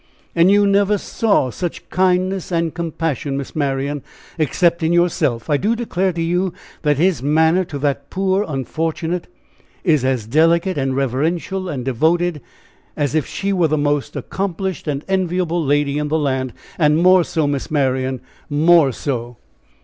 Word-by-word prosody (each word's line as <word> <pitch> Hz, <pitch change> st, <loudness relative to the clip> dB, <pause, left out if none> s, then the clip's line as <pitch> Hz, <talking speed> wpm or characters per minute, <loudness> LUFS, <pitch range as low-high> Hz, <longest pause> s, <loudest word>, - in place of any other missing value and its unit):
"And 170 Hz, +2 st, +5 dB
you 205 Hz, +1 st, +5 dB
never 200 Hz, +1 st, +3 dB
saw 200 Hz, -, +1 dB
such 175 Hz, +4 st, -5 dB
kindness 185 Hz, 0 st, +1 dB
and 165 Hz, -2 st, 0 dB
compassion, 160 Hz, -5 st, -3 dB
Miss 140 Hz, -, -6 dB
Marian, 140 Hz, -1 st, -1 dB, 0.4 s
except 170 Hz, +4 st, +2 dB
in 160 Hz, +1 st, +1 dB
yourself. 175 Hz, -9 st, +1 dB
I 150 Hz, -2 st, +2 dB
do 215 Hz, +9 st, +1 dB
declare 195 Hz, -5 st, -1 dB
to 165 Hz, -, -3 dB
you, 180 Hz, +2 st, 0 dB, 0.3 s
that 150 Hz, -3 st, +1 dB
his 175 Hz, -2 st, +2 dB
manner 160 Hz, +5 st, +3 dB
to 145 Hz, -, -6 dB
that 140 Hz, 0 st, -2 dB
poor 195 Hz, +1 st, +1 dB
unfortunate 160 Hz, +4 st, -3 dB, 0.6 s
is 155 Hz, -7 st, +3 dB
as 130 Hz, -4 st, 0 dB
delicate 165 Hz, -, +2 dB
and 135 Hz, -2 st, -1 dB
reverential 160 Hz, +8 st, -1 dB
and 130 Hz, -6 st, -4 dB
devoted 160 Hz, +5 st, +1 dB, 0.6 s
as 145 Hz, -1 st, 0 dB
if 155 Hz, -3 st, 0 dB
she 200 Hz, 0 st, -2 dB
were 175 Hz, -4 st, +3 dB
the 155 Hz, 0 st, 0 dB
most 145 Hz, -1 st, -1 dB
accomplished 190 Hz, -3 st, -3 dB
and 145 Hz, -1 st, -2 dB
enviable 180 Hz, -3 st, 0 dB
lady 145 Hz, 0 st, +1 dB
in 150 Hz, -, -1 dB
the 155 Hz, +2 st, +1 dB
land, 130 Hz, -4 st, -1 dB, 0.3 s
and 150 Hz, -1 st, +4 dB
more 180 Hz, +1 st, +5 dB
so, 160 Hz, -2 st, -1 dB
Miss 145 Hz, -2 st, -2 dB
Marian, 130 Hz, -3 st, 0 dB, 0.3 s
more 155 Hz, -1 st, +4 dB
so!" 120 Hz, -2 st, -4 dB
160 Hz, 155 wpm, -19 LUFS, 140-180 Hz, 0.6 s, And